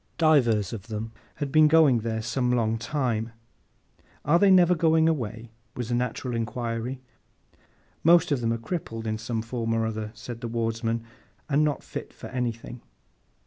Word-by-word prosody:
Divers 120 - +3
of 110 -1 -7
them 110 0 -5 0.2
had 145 -2 -4
been 155 0 +6 0.3
there 110 0 -3
some 125 +3 -1
long 115 -2 +1
time. 115 -3 -2 0.9
'Are 165 +4 +4
they 200 - +5
never 180 -2 +6
going 160 -1 +3
away?' 115 -7 -2 0.2
was 120 -2 -4
the - - -1
natural 125 0 -2
inquiry. 115 +2 -3 1.0
'Most 170 +1 +5
of 140 -4 +1
them 115 -1 0
are 115 - 0
crippled, 115 -4 -5
in 110 0 -2
some 110 0 -3
form 115 -1 -2
or 115 0 +1
other,' 110 -1 -3
said 120 -1 -8
the 120 - -3
Wardsman, 115 0 -1 0.4
'and 150 0 +2
not 150 -2 -1
fit - - -7
for - - -10
anything. 120 -1 -4
120 Hz, 160 wpm, -26 LUFS, 115-145 Hz, 1.0 s, been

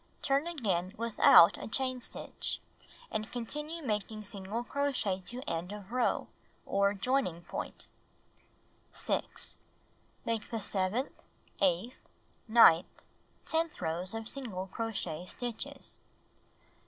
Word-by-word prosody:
Turn 280 +3 +2
again 200 - -1
without 230 -6 +7
a - - -5
chain 255 +2 0
stitch, - - -4 0.5
and 215 0 -2
continue 300 +7 -4
making 215 -1 -2
single 205 +2 -4
crochet 250 -9 0
to 250 +2 -5
end 170 +3 -2
of 205 0 -8
row, 250 0 +1 0.4
or 200 +1 +2
joining 195 -6 0
pomt. - - -6 1.1
6. - - -2 0.7
Make 230 -2 -1
the 230 - -2
seventh, 200 +5 0 0.5
eighth, 190 +6 +2 0.5
ninth, 220 -7 +6 0.4
tenth 325 0 0
rows 175 +5 -2
of 225 -1 -4
single 225 -10 -1
crochet 190 -6 -3
stitches. 240 +3 -5
220 Hz, 105 wpm, -32 LUFS, 190-255 Hz, 1.1 s, without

